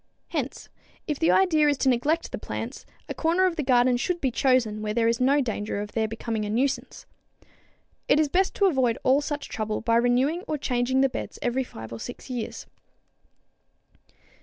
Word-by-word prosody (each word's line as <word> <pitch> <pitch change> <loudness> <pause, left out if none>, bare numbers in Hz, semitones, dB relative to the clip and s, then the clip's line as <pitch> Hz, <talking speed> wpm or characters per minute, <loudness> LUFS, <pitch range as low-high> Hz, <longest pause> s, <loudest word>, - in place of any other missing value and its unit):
Hence, - - -4 0.4
if 300 -3 -3
the 325 - +3
idea 315 -6 +4
is 290 -2 +2
to 270 - 0
neglect 285 +7 +1
the - - -5
plants, - - -6 0.2
a - - -4
corner 340 +3 +2
of 365 -2 +1
the 310 - -1
garden 250 -2 +3
should 345 +8 -1
be 265 -5 0
chosen 235 -4 +1
where 210 0 -3
there 230 -1 +2
is 230 +1 +1
no 280 +3 +4
danger 210 -4 -3
of 205 0 -5
their 220 -1 0
becoming 225 0 -3
a 205 - -3
nuisance. 255 +5 -1 1.0
It - - +4
is 310 - +3
best 370 +6 +1
to 400 - +3
avoid 260 -10 +2
all 270 +3 +4
such 290 0 -4
trouble 215 -1 -3
by 230 0 +2
renewing 250 +8 +2
or 305 - -1
changing 260 -1 0
the 270 - +5
beds - - -6
every 250 +2 0
5 110 - -10
or 115 - -7
6 245 - -8
years. 240 -3 -5
255 Hz, 190 wpm, -26 LUFS, 230-295 Hz, 1.0 s, the